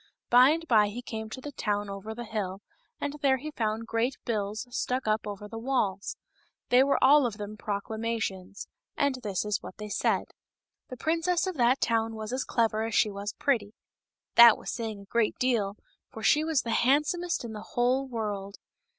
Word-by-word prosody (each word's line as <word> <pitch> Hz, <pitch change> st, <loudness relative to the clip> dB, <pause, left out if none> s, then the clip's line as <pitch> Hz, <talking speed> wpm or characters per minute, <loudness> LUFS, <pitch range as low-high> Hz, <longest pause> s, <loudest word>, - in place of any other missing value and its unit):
By 250 Hz, +2 st, +8 dB
and 330 Hz, +2 st, -1 dB
by 215 Hz, -5 st, +5 dB
he 235 Hz, +4 st, -6 dB
came 220 Hz, -2 st, -6 dB
to 260 Hz, -, -7 dB
the 290 Hz, -, -7 dB
town 205 Hz, -5 st, -2 dB
over 200 Hz, +2 st, -6 dB
the 240 Hz, -, -5 dB
hill, 200 Hz, -3 st, -4 dB, 0.4 s
and 285 Hz, -, -3 dB
there 270 Hz, -2 st, +3 dB
he 305 Hz, +4 st, -7 dB
found 220 Hz, -3 st, -2 dB
great 230 Hz, +3 st, -1 dB
bills 215 Hz, 0 st, -2 dB
stuck 255 Hz, -1 st, -1 dB
up 215 Hz, 0 st, 0 dB
over 205 Hz, 0 st, -6 dB
the 225 Hz, +1 st, -7 dB
walls. 215 Hz, -6 st, -1 dB, 0.5 s
They 250 Hz, +1 st, +6 dB
were 280 Hz, +1 st, +2 dB
all 275 Hz, 0 st, +6 dB
of 215 Hz, -3 st, -6 dB
them 210 Hz, 0 st, -6 dB
proclamations. 205 Hz, -2 st, -4 dB, 0.3 s
And 280 Hz, -2 st, +1 dB
this 205 Hz, -3 st, -2 dB
is 210 Hz, -2 st, -1 dB
what -, -, -10 dB
they 210 Hz, 0 st, -7 dB
said: -, -, 0 dB, 0.6 s
The 255 Hz, -, -7 dB
princess 335 Hz, +5 st, +1 dB
of 375 Hz, -, -2 dB
that 245 Hz, +2 st, +3 dB
town 225 Hz, -1 st, +1 dB
was 220 Hz, +2 st, -5 dB
as 260 Hz, -, -1 dB
clever 225 Hz, -2 st, +1 dB
as 225 Hz, -1 st, -3 dB
she 215 Hz, -, +3 dB
was 200 Hz, +1 st, -5 dB
pretty; 220 Hz, -7 st, 0 dB, 0.6 s
that 235 Hz, -2 st, +9 dB
was -, -, -6 dB
say 230 Hz, -2 st, -3 dB
ing 205 Hz, -2 st, -8 dB
a -, -, -13 dB
great 225 Hz, +2 st, 0 dB
deal, 225 Hz, -6 st, 0 dB, 0.3 s
for 220 Hz, -, -9 dB
she 300 Hz, +6 st, +4 dB
was 315 Hz, -4 st, +1 dB
the 230 Hz, -, -3 dB
handsomest 300 Hz, +7 st, +1 dB
in 225 Hz, -, -6 dB
the 210 Hz, -, -7 dB
whole 250 Hz, +4 st, 0 dB
world. 205 Hz, -5 st, -4 dB
225 Hz, 195 wpm, -28 LUFS, 210-260 Hz, 0.6 s, that